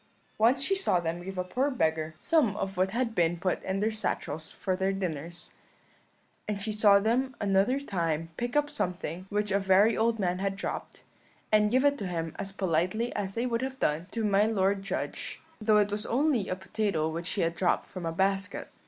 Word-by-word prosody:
Once 250 +5 +4
she 390 - +2
saw 385 - +2
them 170 0 -3
give 190 +1 -7
a 180 - 0
poor 255 +10 0
beggar 160 - 0
some 295 -12 +2
of 195 0 -3
what 185 +1 +2
had 235 +2 -1
been 175 -3 +2
put 180 +1 -1
in 190 +1 -2
their 220 +1 +2
satchels 160 -7 -3
for 185 -2 -2
their 190 +1 0
dinners; 175 -3 -4 0.9
and 210 -1 -2
she 215 +2 -3
saw 210 -1 +6
them 245 +5 0
another 200 +6 +2
time 165 - -2
pick 240 - -3
up 295 0 +3
something 180 - -3
which 210 0 -1
a 200 - +3
very 195 +3 +4
old 225 +1 +2
man 180 -3 0
had 195 0 -1
dropped, 190 - -5 0.5
and 210 -1 +5
give 260 +5 +3
it 285 -1 +3
him 165 -4 -3
as 195 - -4
politely 190 +5 0
as 195 -2 -3
they 235 +2 0
would 235 -1 0
have 265 0 -4
done 155 +4 0
to 225 +2 -3
my 205 +1 +4
lord 200 -2 +1
judge, 195 - -3 0.2
though 215 0 +4
it 205 -1 +3
was 210 +1 -2
only 260 -4 +1
a 185 - 0
potato 190 -4 -1
which 165 +2 -4
he 200 - -1
had 170 0 +1
dropped 180 - +1
from 185 - -8
a - - -1
basket. 195 +3 -1
195 Hz, 205 wpm, -29 LUFS, 180-225 Hz, 0.9 s, saw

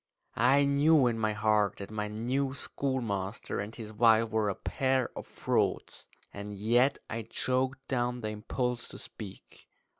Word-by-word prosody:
I 135 +5 +4
knew 140 +1 +5
in 115 -2 +1
my 110 -1 +1
heart 105 -1 +2
that 100 +1 -8
my 105 -1 -2
new 130 +6 -1
schoolmaster 115 -10 -2
and 105 +3 -5
his 110 -2 -8
wife 110 0 +4
were 110 -1 +1
a 100 - -2
pair 130 -2 0
of - - -7
frauds, - - -1 0.3
and 100 +1 -6
yet 120 +7 +3
I 115 0 -3
choked 130 +4 -1
down 125 -1 -1
the 110 - -2
impulse 120 +3 -2
to - - -9
speak. 100 -4 -10
115 Hz, 155 wpm, -30 LUFS, 105-130 Hz, 0.3 s, knew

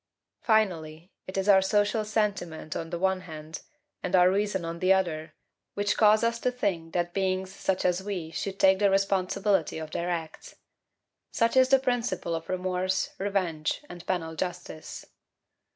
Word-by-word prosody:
Finally, 175 -6 0 0.2
it 185 - -6
is 195 +1 0
our 195 -2 +7
social 205 +3 +1
sentiment 200 -8 -2
on 165 - -4
the 170 - -3
one 190 +1 +1
hand, 155 -2 -8 0.4
and 180 - 0
our 180 0 +6
reason 195 -2 0
on 165 0 -5
the 185 +2 +3
other, 160 -5 0 0.4
which 205 0 0
cause 215 0 +5
us 230 0 +1
to 250 - +1
think 195 -10 -2
that 175 0 -1
beings 190 -1 -1
such 190 -1 -1
as 180 0 +2
we 190 -5 -5
should 195 +3 -4
take 190 0 +5
the 205 -1 +4
responsibility 195 -2 +1
of 155 -1 -6
their 175 +1 -2
acts. 165 -2 -5 0.8
Such 230 +1 +1
is 260 0 +5
the 270 - +7
principle 245 -8 -1
of 165 0 -5
remorse, 185 0 -1
revenge, 185 - -1
and 175 -1 -9
penal 165 -3 -2
justice. 175 -2 -6
185 Hz, 165 wpm, -27 LUFS, 170-205 Hz, 0.8 s, our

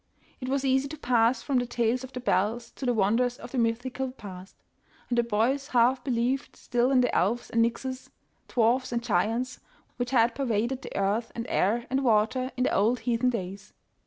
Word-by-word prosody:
It 255 - -5
was 275 0 0
easy 265 +1 +2
to 310 +2 -8
pass 235 -2 +2
from 270 -2 +1
the 245 - -2
tales 240 +1 0
of 260 - -8
the 255 - -5
bells 235 0 0
to 265 - -6
the 245 - +3
won 210 +1 +3
ders 245 0 0
of 240 - -10
the 260 - -1
mythical 245 +3 -1
past, 195 -6 -10 0.5
and 245 - 0
the 240 - +4
boys 235 +5 0
half 250 0 +3
believed 255 +1 -1
still 245 +1 0
in 265 -2 +4
the 245 - 0
elves 225 +7 0
and 230 - +2
nixies, 255 +3 -3 0.4
dwarfs 240 +2 +2
and 235 -1 -1
giants, 230 +7 0 0.4
which 245 0 -2
had 235 -2 +3
pervaded 245 0 -1
the - - -9
earth 205 +4 0
and 230 - -4
air 230 +5 +1
and 270 +1 +1
water 240 +3 +2
in 250 - +1
the - - +1
old 225 +4 +2
heathen 240 +1 +1
days. 195 -4 -5
240 Hz, 200 wpm, -27 LUFS, 230-255 Hz, 0.5 s, the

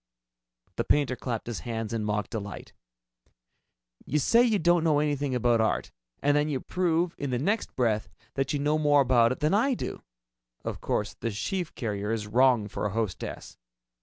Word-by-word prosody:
The - - +1
painter 140 -3 +2
clapped 120 -3 -4
his 115 -6 -4
hands 115 +4 -4
in 115 -2 -1
mock 105 -1 -1
delight. 100 -4 -6 1.3
"You 150 - -1
say 230 - +4
you 230 -4 +3
don't 175 -1 +3
know 155 -3 +3
anything 145 -2 0
about 120 -1 +3
art, 110 - 0 0.3
and 145 +1 +3
then 150 +1 +2
you 135 -3 -1
prove 175 0 0
in 140 - -2
the 125 - 0
next 200 - -1
breath 110 -4 0 0.2
that 135 -1 -1
you 145 - 0
know 150 +2 +1
more 145 -1 +4
about 120 -3 +4
it 130 - -4
than 150 +3 +2
I 250 +6 +3
do! - - -5 0.6
Of - - -4
course 105 - -1
the 115 - -4
sheave 155 - -3
carrier 105 -3 -3
is 110 -2 -2
wrong 120 0 +3
for 105 - -3
a 100 - -6
hostess! 110 -5 -4
130 Hz, 185 wpm, -27 LUFS, 110-150 Hz, 1.3 s, say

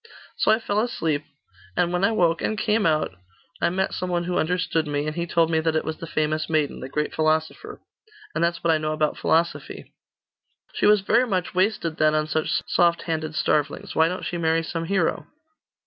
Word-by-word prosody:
So - - +1
I 220 - +5
fell 210 -2 -1
asleep; 165 -10 -1 0.5
and 175 0 +1
when 180 +1 0
I 225 - +4
woke, 170 -6 +2
and 215 - -1
came 215 -2 +2
out, 155 -9 +1 0.5
I - - +3
met 190 +2 -1
some 185 - -3
one 175 -1 0
who 175 +1 -1
understood 175 -2 0
me, 145 0 -1
and 155 0 -3
he 170 0 -2
told 165 -1 +2
me 160 - +2
that 160 0 0
it 155 - 0
was 160 0 -4
the 165 - -8
famous 155 0 -1
maiden, 155 -3 0
the 130 - -7
great 150 +2 -2
philosopher. 160 - -1 0.5
And - - 0
that's 170 0 0
what 165 -1 +3
I 155 - +1
know 155 0 -1
about 155 -1 0
philosophy.' 170 +1 -1 0.8
'She - - +2
was 210 -1 +5
very 240 +6 +2
much 185 -5 -1
wasted 185 -4 0
then, 155 0 +3
on 155 0 +1
such 155 0 -1
soft 170 -1 +2
handed 155 -2 -3
starvelings. 150 -1 0
Why 160 - +4
don't 180 +2 -4
she 175 - -3
marry 165 0 +1
some 165 +1 -4
hero? 185 -2 0
165 Hz, 210 wpm, -24 LUFS, 155-180 Hz, 0.8 s, I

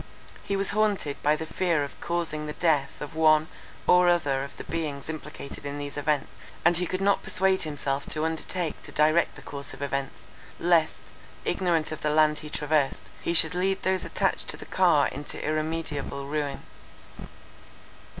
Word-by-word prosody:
He 200 - -1
was 195 0 0
haunted 205 -8 0
by 150 +1 +3
the 160 - -4
fear 170 -3 +1
of 140 - -8
causing 165 -3 -2
the 150 - -4
death 150 -5 +1
of 150 +2 -6
one 155 0 +4 0.4
or 180 0 +6
other 145 -6 +2
of 140 - -9
the - - -6
beings 155 -4 -4
implicated 155 -3 -7
in 145 0 -4
these 145 -1 -5
events; 145 0 -1 0.3
and 175 0 +6
he 180 +1 +1
could 185 +1 -2
not 200 0 +3
persuade 190 0 +1
himself 145 -2 -2
to 155 0 0
undertake 160 +1 -2
to - - -9
direct 155 +3 +3
the - - -12
course 140 -1 -6
of - - -14
events, 140 -1 -3 0.4
lest, 170 -2 +2 0.3
ignorant 170 -5 +1
of 155 - -5
the 150 - +1
land 150 0 +4
he 150 - -8
traversed, 150 -2 0 0.2
he 170 - -1
should 170 - +6
lead 190 +2 0
those 185 -1 +1
attached - - 0
to - - -3
the - - -10
car - - +4
into - - -7
irremediable 155 -3 -2
ruin. 145 0 -3
155 Hz, 175 wpm, -27 LUFS, 145-175 Hz, 0.4 s, or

